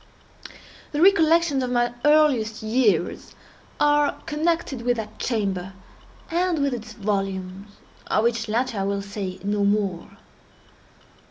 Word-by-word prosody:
The 295 - -1
recollections 330 -5 +4
of 255 - -2
my 240 -1 +1
earliest 280 -8 +3
years 215 -6 0 0.4
are 295 0 +2
connected 315 -4 -1
with 245 0 0
that 215 -1 -7
chamber, 195 -5 -2 0.6
and 350 0 +1
with 280 -2 0
its 220 -2 -7
volumes—of 195 0 -3
which 230 -1 0
latter 230 -1 -1
I - - 0
will 200 0 -2
say 200 -2 -5
no 205 0 0
more. 200 -3 -1
225 Hz, 115 wpm, -24 LUFS, 200-290 Hz, 0.6 s, recollections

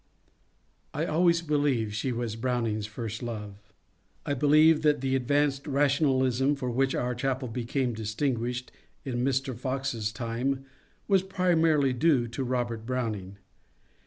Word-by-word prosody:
I 155 +3 0
always 170 +1 +2
believe 145 -8 +1
she 125 +4 -1
was 120 -2 -3
Browning's 115 -3 -1
first 110 0 -6
love. 105 -4 -5 0.7
I 145 - 0
believe 150 +3 +5
that 150 -4 +2
the 135 0 0
advanced 140 +2 +1
rationalism 135 -2 +2
for 125 -3 -3
which 135 +2 +1
our 125 0 -1
chapel 130 +1 -2
became 120 +2 -2
distinguished 120 +2 -2 0.3
in 125 -2 -2
Mr. 135 -1 0
Fox's 130 -3 -2
time 125 +5 -2 0.4
was 195 -2 +4
primarily 165 -7 +2
due 130 -2 +2
to 125 +3 -3
Robert 120 -3 -2
Browning. 110 -6 -3
130 Hz, 130 wpm, -28 LUFS, 115-145 Hz, 0.7 s, believe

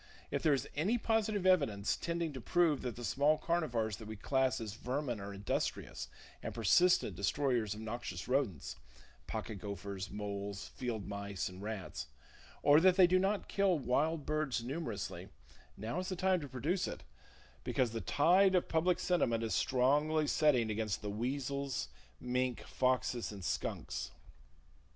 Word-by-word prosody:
If - - 0
there 150 -3 +4
is 135 - -3
any 190 +11 +2
positive 215 -4 0
evidence 140 - +3
tending 170 -2 -2
to 130 - -6
prove 165 0 +2
that 125 -3 -4
the 120 - -6
small 145 +5 +3
carnivores 120 - 0
that 110 - -10
we 110 - -6
class 130 +4 +1
as 110 -3 -5
"vermin" 125 0 -3
are 100 +1 -6
industrious 100 0 -3 0.3
and - - -5
persistent 120 - +4
destroyers 110 - 0
of 110 - -8
noxious 110 -5 -5
rodents—pocket 95 - -4
gophers, 100 0 -5
moles, 100 -1 -5
field 115 -5 -4
mice 100 -1 -3
and 90 +1 -11
rats—or 65 - -1
that 185 +1 +5
they 185 -1 +8
do 185 +1 +4
not 195 +2 0
kill 195 -3 +2
wild 150 +4 0
birds 150 -6 -1
numerously, 120 - -4 0.5
now 115 +11 -3
is 185 - -3
the 185 - -2
time 185 0 +2
to 145 - -6
produce 150 +9 -1
it, - - -6 0.6
because 125 -3 +1
the 115 -1 -3
tide 180 - +4
of 180 - +2
public 170 +2 +2
sentiment 120 -11 +1
is 110 - -1
strongly 150 +5 +2
setting 135 -8 +3
against 105 -1 -2
the 105 - -2
weasels, 130 - -2 0.3
mink, 125 0 -1
foxes 125 -2 0
and 100 -3 -8
skunks. 65 +1 -3
125 Hz, 150 wpm, -34 LUFS, 105-155 Hz, 0.6 s, they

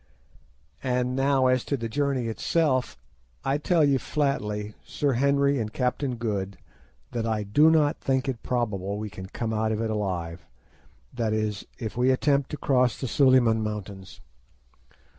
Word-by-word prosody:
"And 125 -1 0
now 135 0 +2
as 130 -1 +3
to 140 - -1
the 115 -2 -3
journey 135 0 -1
itself, 130 - 0 0.5
I 135 +2 +1
tell 160 0 +3
you 140 -2 +3
flatly, 105 -9 -2
Sir 145 -2 -1
Henry 140 +2 +2
and 110 -2 -3
Captain 125 +1 -1
Good, 100 -4 -3 0.5
that 115 -1 -2
I 110 -2 0
do 145 +11 +5
not 150 -2 +3
think 135 0 0
it 125 -4 -3
probable 105 -5 -2
we 105 -1 -5
can 95 0 -8
come 110 +3 -3
out 110 0 0
of 110 - -1
it 110 -1 -1
alive, 90 -5 -3 0.7
that 115 -3 -1
is, 110 -2 -2
if 110 -3 -5
we 125 +1 +3
attempt 140 +1 +2
to 150 - -5
cross 125 -4 +2
the 130 - -3
Suliman 125 -4 +4
Mountains. 100 -3 -6
125 Hz, 160 wpm, -26 LUFS, 105-135 Hz, 0.7 s, do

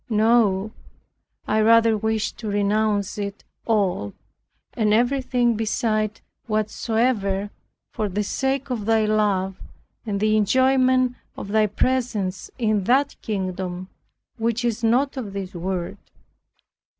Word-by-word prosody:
No; 215 -2 +3 0.8
I 215 +1 +2
rather 230 0 +5
wish 220 0 -1
to 220 - -8
renounce 205 0 0
it 200 0 -5 0.2
all, 190 - 0 0.6
and 215 -2 +2
everything 245 -1 +1
beside 215 -1 -1 0.3
whatsoever, 215 -2 0 0.4
for 210 -1 -2
the 205 +3 -1
sake 270 +5 -2
of 220 -4 -3
Thy 225 -1 +3
love, 200 -3 0 0.4
and 205 -3 -2
the 215 +1 +2
enjoyment 255 +3 +3 0.2
of 200 - -7
Thy 215 0 +3
presence 210 -4 -1
in 215 -5 0
that 265 +5 +2
kingdom 185 -2 -4 0.5
which 230 +1 0
is 235 0 -1
not 260 +5 +2
of 215 -7 -5
this 195 -2 -5
world. 180 +2 -3
215 Hz, 115 wpm, -23 LUFS, 200-235 Hz, 0.8 s, rather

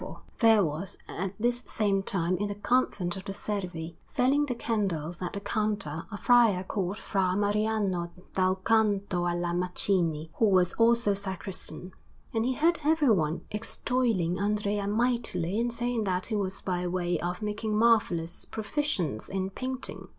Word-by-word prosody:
Salvi_) - - -5
Anderson] - - -11 0.2
There 225 -3 +6
was 165 +6 -4
at 195 +2 -4
this 240 +2 +1
same 200 -2 +1
time 185 -2 0
in 205 - -1
the 205 - -4
Convent 205 -5 +1
of 190 - -8
the 195 - -4
Servi, 180 -5 -4
selling 275 +4 +2
the 250 - -2
candles 185 -8 -2
at 180 - -3
the 200 - -3
counter, 205 -7 -2
a 205 - -4
friar 225 -3 +4
called 190 0 -2
Fra 190 -4 0
Mariano 205 -4 0 0.2
dal 185 0 +2
Canto 200 -3 +1
alla 175 0 -1
Macine, 175 -3 +1
who 220 - +5
was 185 -2 +3
also 230 -2 +3
sacristan; 190 -1 -6 0.4
and 225 +1 +1
he 260 - +1
heard 330 +5 +2
everyone 230 - +3
extolling 210 -5 0
Andrea 205 0 0
mightily 215 -4 0
and 240 +1 0
saying 240 -1 -1
that 185 -1 0
he 220 - -2
was 195 -2 -2
by 180 -1 -1
way 175 -2 0
of 180 +4 -3
making 210 0 -1
marvellous 210 -8 +2
proficience 210 - -2
in 190 0 -2
painting. 255 +4 -4
200 Hz, 160 wpm, -28 LUFS, 180-225 Hz, 0.4 s, There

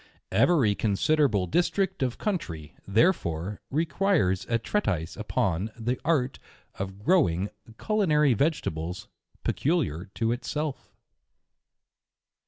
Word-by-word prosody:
Every 135 -12 +4
considerable 110 +1 +2
district 175 - 0
of 125 -2 0
country, 85 - -3
therefore, 100 - +1
requires 155 - +1
a 115 - +3
treatise 100 - -1
upon 105 -3 -1
the 120 +2 -2
art 140 -5 +1 0.4
of 95 +1 -5
growing 105 - +2 0.3
culinary 155 - +3
vegetables 100 - -2 0.3
pe - - +1
culiar 110 - -1
to 115 0 +1
itself. 145 +4 -3
115 Hz, 95 wpm, -27 LUFS, 95-155 Hz, 0.4 s, Every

